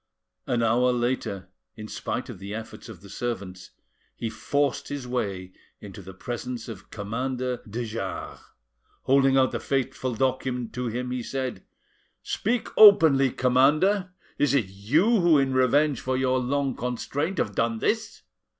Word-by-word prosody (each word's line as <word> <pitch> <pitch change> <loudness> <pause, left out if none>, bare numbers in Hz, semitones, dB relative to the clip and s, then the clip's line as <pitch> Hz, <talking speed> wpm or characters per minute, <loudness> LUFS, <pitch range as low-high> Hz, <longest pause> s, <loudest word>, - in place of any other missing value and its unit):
An 120 -1 +1
hour 120 +3 +3
later, 120 -5 -2 0.3
in 110 -1 -8
spite - - -4
of - - -9
the 100 +2 -6
efforts 110 +1 -8
of 105 -7 -11
the 100 - -13
servants, 100 -4 -5 0.5
he 115 - -4
forced 140 +5 -1
his 145 -3 -5
way 100 -7 -3 0.3
into 100 0 -10
the 95 0 -11
presence 120 +2 -5
of 105 -5 -9
Commander 125 +4 -3
de 120 +3 -3
Jars. 105 -4 -5 0.6
Holding 135 0 +4
out 130 -1 +4
the - - -3
fateful 130 -2 -2
document 130 -1 -1
to 125 0 -3
him, 125 +2 -3
he 125 -1 -2
said: 130 0 -4 0.6
"Speak 235 +3 -1
openly, 160 -11 +8
commander! 150 +11 +3 0.3
Is 145 -1 +3
it 115 -9 +1
you 150 - +2
who 170 -3 +5
in 135 -1 +1
revenge 135 +2 +3
for 130 0 -1
your 130 0 +1
long 135 +1 0
constraint 140 +8 -3
have 100 - -1
done 115 +2 0
this? 215 - -2
125 Hz, 150 wpm, -26 LUFS, 110-135 Hz, 0.6 s, openly